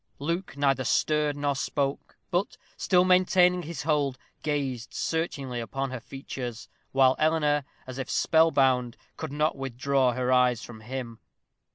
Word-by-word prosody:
Luke 170 +2 -3
neither 135 -2 +2
stirred 150 +4 +1
nor 145 -1 0
spoke, 135 +1 -2
but, 180 +4 -1 0.2
still 180 -1 +3
maintaining 180 -1 +4
his 160 -3 -6
hold, 145 -4 +1 0.2
gazed 135 -5 -3
searchingly 140 -7 -2
upon 135 +3 -3
her 130 - -4
features, 125 -2 -7 0.2
while 130 -1 +4
Eleanor, 150 -2 +2 0.2
as 130 +1 -7
if 135 - -4
spell 160 0 +4
bound, 130 -5 +2 0.2
could 160 -3 -6
not 150 +2 +1
withdraw 135 0 0
her 130 +1 -1
eyes 125 -2 +3
from 120 -2 -10
him. 120 -1 -6
135 Hz, 145 wpm, -27 LUFS, 130-155 Hz, 0.2 s, maintaining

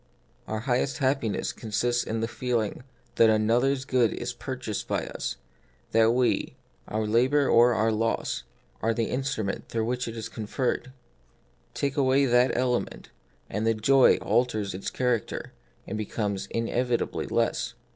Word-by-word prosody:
Our 110 0 -3
highest 130 +2 0
happiness 130 -5 0
consists 120 +2 0
in 110 0 -3
the 115 - 0
feeling 115 -2 -2 0.4
that 115 - +6
another's 120 +5 +2
good 125 -5 +2
is 120 +1 -4
purchased 120 -3 -5
by - - -1
us, - - -4 0.6
that 115 0 +5
we 125 -1 +1 0.2
— - - -37
our 110 0 -1
labour 130 +6 +3
or 120 0 +5
our 110 +1 +2
loss 115 +1 -1 0.2
— - - -35
are 115 0 +1
the 115 -1 -1
instrument 125 -6 -2
through 115 -1 -1
which 125 +1 -2
it 115 0 -6
is 110 - -4
conferred. 125 +3 -2 0.8
Take 140 +1 -1
away 135 0 +4
that 125 0 +3
element, 125 -1 -1 0.4
and 105 +2 -3
the 115 - +3
joy 130 +5 +5
alters 110 -5 0
its 95 - -4
character, 125 -4 -2 0.3
and 110 +2 -4
becomes 105 -2 -2
inevitably 120 +1 -1
less. - - 0
120 Hz, 150 wpm, -27 LUFS, 110-130 Hz, 0.8 s, that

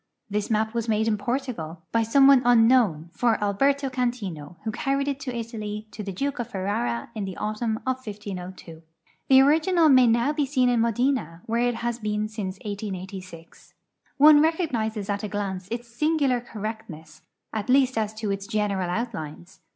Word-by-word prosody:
This 210 0 -1
map 220 0 0
was 235 -1 -2
made 220 0 +1
in 220 - +2
Portugal, 210 - -4
by 230 - +2
some 250 +5 +4
one 275 -2 +7
unknown, 225 -9 +4
for 235 -2 +2
Allierto 275 +8 +1
Cantino, 205 - -3
who 220 - -2
carried 275 +4 -1
it 280 -1 -2
to 255 -3 -5
Italy 215 -2 -5
to 210 - -7
the 200 -1 -5
Duke 275 +8 -3
of 240 -1 -3
Ferrara 185 - -2
in 215 -3 -4
the 190 -1 -7
autumn 220 +1 -2
of 260 0 -2
1502. 185 -6 -8 0.5
The 265 0 +8
original 320 +4 +4
may 255 -3 +6
now 235 +5 +2
be 295 -2 0
seen 255 -2 +2
in 240 -2 +2
Modena, 230 - 0
where 230 +1 0
it 245 -1 +1
has 235 +1 -3
been 210 -1 -1
since 205 -3 -5
1880. 190 -4 -6 0.7
One 295 +1 +8
recognizes 240 - 0
at 205 -1 -2
a 210 - -3
glance 195 -3 -4
its 235 +1 -5
singular 275 0 +1
correct 220 -2 -6
ness, 155 -1 -12 0.3
at 215 +1 -3
least 260 0 +4
as 220 -1 -1
to 215 -2 -3
its 195 0 -4
general 205 -4 -1
outlines. 185 -4 -5
220 Hz, 175 wpm, -25 LUFS, 200-255 Hz, 0.7 s, The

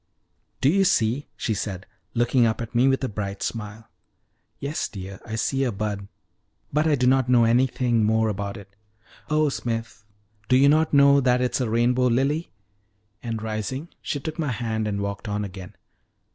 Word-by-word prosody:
"Do 135 - +4
you 195 +5 +3
see!" 130 - +1
she 110 - -1
said, 95 -1 -4 0.3
looking 120 0 +3
up 110 - -1
at 115 -1 -6
me 125 +2 +4
with 135 0 +1
a - - +1
bright 100 -2 -4
smile. 110 0 -5 0.7
"Yes, 145 +3 -2
dear, 95 -1 -8
I 110 - -4
see 135 +4 0
a 125 - 0
bud; 100 -1 -4 0.7
but 150 +2 +2
I 150 - +4
do 125 -2 0
not 130 0 +3
know 120 -2 +5
anything 120 -1 +2
more 110 +1 +2
about 100 0 -3
it." 100 -1 -14 0.5
"Oh, 155 -1 +3
Smith, 115 -4 -4 0.5
do 125 - +5
you 140 +2 +6
not 155 +2 +3
know 140 0 +6
that 125 -1 +3
it 125 0 0
is - - 0
a 120 - -1
rainbow 120 +3 +2
lily!" 135 +7 +1 0.7
And 115 -2 -4
rising, 110 - -4
she 145 - -3
took 155 +4 -6
my 150 -4 0
hand 110 -2 -2
and 100 -1 -2
walked 100 +2 -4
on 105 0 -2
again. 95 -1 -9
120 Hz, 185 wpm, -24 LUFS, 105-135 Hz, 0.7 s, you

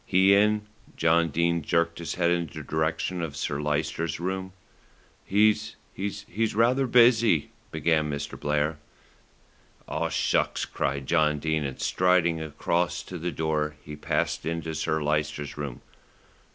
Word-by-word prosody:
"He 95 +1 +4
in?" 105 +1 +3 0.3
John 85 0 +3
Dene 85 +2 +1
jerked 85 +2 0
his 85 - -4
head 85 -1 +2
in 85 -1 0
the - - -8
direction 80 +3 -1
of 75 -4 -4
Sir 70 0 -2
Lyster's 75 +1 -1
room. 95 +1 -3 0.7
"He's 105 +2 +2 0.2
he's 100 +2 -3
rather 125 +4 +3
busy," 115 - +4 0.2
began 80 -1 +1
Mr. 70 -1 -4
Blair. 75 +1 0 1.1
"Oh, - - -2
shucks!" - - 0
cried 70 0 -2
John 75 -1 +2
Dene, 80 0 -1
and 70 -2 -5
striding 90 -3 +2
across 85 +3 -1
to 90 -1 -7
the 90 +2 -2
door 75 -1 -1
he 75 - -8
passed 75 - -1
into 80 0 -3
Sir 80 0 -1
Lyster's 75 -1 -1
room. 70 -4 -6
85 Hz, 140 wpm, -26 LUFS, 75-95 Hz, 1.1 s, He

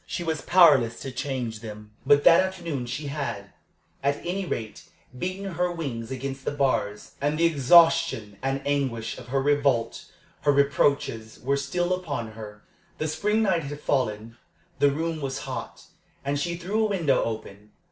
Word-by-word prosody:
She 175 - -3
was 160 -2 -2
powerless 145 -10 +5
to 135 - -5
change 125 -4 -3
them; 105 -1 -9 0.2
but 145 0 +5
that 165 - +7
afternoon 170 -9 -3
she 145 +5 -4
had, 140 -9 -4 0.5
at 140 +1 +1
any 185 +2 -2
rate, 110 -8 -5 0.3
beaten 185 +6 -4
her 175 +1 0
wings 130 -9 -5
against 135 +1 -5
the - - -1
bars, 130 -8 -1
and 145 +2 0
the 170 - +3
exhaustion 165 - +4
and 135 +1 -2
anguish 130 -6 -1
of - - -11
her 135 +2 0
revolt, 140 -4 +1 0.4
her 145 - +3
reproaches, 140 -5 +1
were 140 +3 0
still 175 +6 -1
upon 145 -11 -3
her. 105 -1 -10 0.3
The 155 - -2
spring 210 +8 +1
night 175 -7 +1
had 145 +1 -6
fallen. 115 -5 -1 0.4
The 145 - +5
room 160 +2 -2
was 135 -1 -3
hot, - - -6 0.4
and 140 +1 0
she 170 +3 -2
threw 200 +6 -1
a 215 - +1
window 165 -9 +2
open. 105 -2 -6
140 Hz, 165 wpm, -26 LUFS, 120-165 Hz, 0.5 s, that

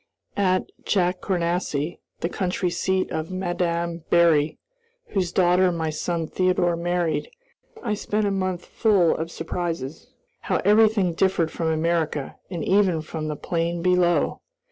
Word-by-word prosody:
At 185 -2 +2 0.2
Jacournassy, 175 -4 0 0.2
the - - +1
country 180 -1 -1
seat 190 +2 0
of 160 +2 -3
Mme. 175 -2 -1
Berry, 160 -3 +4 0.5
whose 180 -3 -1
daughter 180 0 +4
my 160 -2 -2
son 165 +1 -2
Theodore 180 0 +1
married, 170 -3 -1 0.5
I 220 -4 0
spent 210 0 -1
a 200 - +1
month 185 -2 -2
full 195 -7 +3
of 160 +1 -3
surprises. 165 -4 -4 0.3
How - - -2
everything 210 -3 +4
differed 170 -2 +1
from 165 - -2
America, 160 -2 0
and 170 -4 -4
even 185 -5 +3
from 155 0 -5
the 150 - -2
plain 170 +2 -2
below! 180 -1 +2
175 Hz, 130 wpm, -24 LUFS, 165-185 Hz, 0.5 s, Berry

